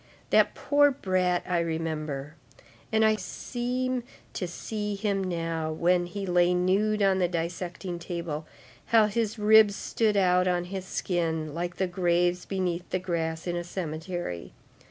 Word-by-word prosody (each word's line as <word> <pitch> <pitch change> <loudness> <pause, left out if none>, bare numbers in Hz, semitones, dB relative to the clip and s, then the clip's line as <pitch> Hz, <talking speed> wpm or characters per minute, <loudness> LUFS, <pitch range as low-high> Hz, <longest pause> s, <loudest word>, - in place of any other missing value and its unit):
That - - +4
poor 290 0 +4
brat, 185 -8 0
I 180 -1 +1
remember, 155 -3 -3 0.6
and 220 0 +4
I 215 0 +4
seem 250 +2 -2 0.3
to 180 - -3
see 210 +4 -4
him 200 -1 -1
now, 165 -3 -2
when 175 +2 +2
he 195 +3 -5
lay 180 -1 +3
nude 200 +4 +2
on 190 -1 +3
the 180 - +3
dissecting 175 +1 -4
table, 170 -3 -4 0.4
how 225 -2 +5
his 220 +1 -1
ribs 215 -1 +6
stood 215 -1 0
out 180 -1 +4
on 175 -1 +1
his 190 +1 -5
skin 160 -5 -2
like 175 +2 -3
the 190 - 0
graves 175 0 +1
beneath 180 -2 -2
the - - 0
grass 165 -3 -2
in 175 -1 -2
a 175 - -2
cemetery. 165 - -5
180 Hz, 150 wpm, -27 LUFS, 170-200 Hz, 0.6 s, ribs